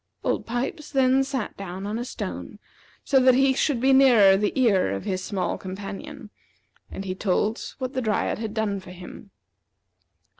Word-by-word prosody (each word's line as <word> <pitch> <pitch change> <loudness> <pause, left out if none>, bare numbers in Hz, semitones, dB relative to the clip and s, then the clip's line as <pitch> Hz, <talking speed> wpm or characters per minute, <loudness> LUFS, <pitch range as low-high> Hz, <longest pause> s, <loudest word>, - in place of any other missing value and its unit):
Old - - -1
Pipes 265 +6 -3
then 265 -1 +3
sat 265 -4 -4
down 190 0 -7
on 215 +3 -3
a 240 - -4
stone, - - -6 0.5
so 270 - +3
that 255 -1 +5
he 270 +1 +4
should 270 -1 0
be 265 +2 +4
nearer 240 -8 +6
the 205 +1 0
ear 205 - +3
of 95 - -4
his 185 -1 -3
small 195 -3 -2
companion, 205 +7 -8 0.6
and 195 - -7
he 185 - -2
told 210 +4 -1
what 260 -1 -4
the 260 - -1
Dryad 215 -2 -1
had 220 -1 -5
done 210 -3 -1
for 185 - -13
him. 180 +3 -11
220 Hz, 175 wpm, -25 LUFS, 195-260 Hz, 0.6 s, nearer